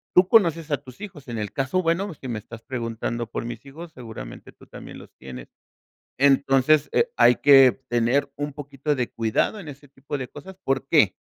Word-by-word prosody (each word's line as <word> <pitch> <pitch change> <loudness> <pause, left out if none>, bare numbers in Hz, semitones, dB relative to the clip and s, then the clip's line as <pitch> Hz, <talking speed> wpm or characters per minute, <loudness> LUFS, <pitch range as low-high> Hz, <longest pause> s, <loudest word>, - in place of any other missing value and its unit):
tú 180 0 +6
conoces 170 -7 +3
a 145 - +2
tus 130 +1 -15
hijos. 165 -10 -10
En 115 -2 -5
el 105 -2 -4
caso, 135 +7 -1
bueno, 175 +3 -1
si 135 - -10
me 115 -3 -3
estás 115 +2 -12
preguntando 120 -1 -4
por - - -4
mis 120 +2 -7
hijos, 160 +5 -10
seguramente 110 - -10
tú - - -20
también - - -11
los - - -14
tienes. 65 -1 -10 0.7
Entonces, 140 +2 +3
eh, 470 +1 +2
hay 125 - +6
que 135 -3 +7 0.2
tener 125 +4 +1
un 145 +1 -4
poquito 145 0 -3
de 125 -3 -2
cuidado 115 - 0
en 160 - -10
ese 145 0 -11
tipo 140 +1 -6
de 130 - -5
cosas. 185 +9 -12
¿Por 135 0 -1
qué? 125 - +4
135 Hz, 195 wpm, -24 LUFS, 120-150 Hz, 0.7 s, que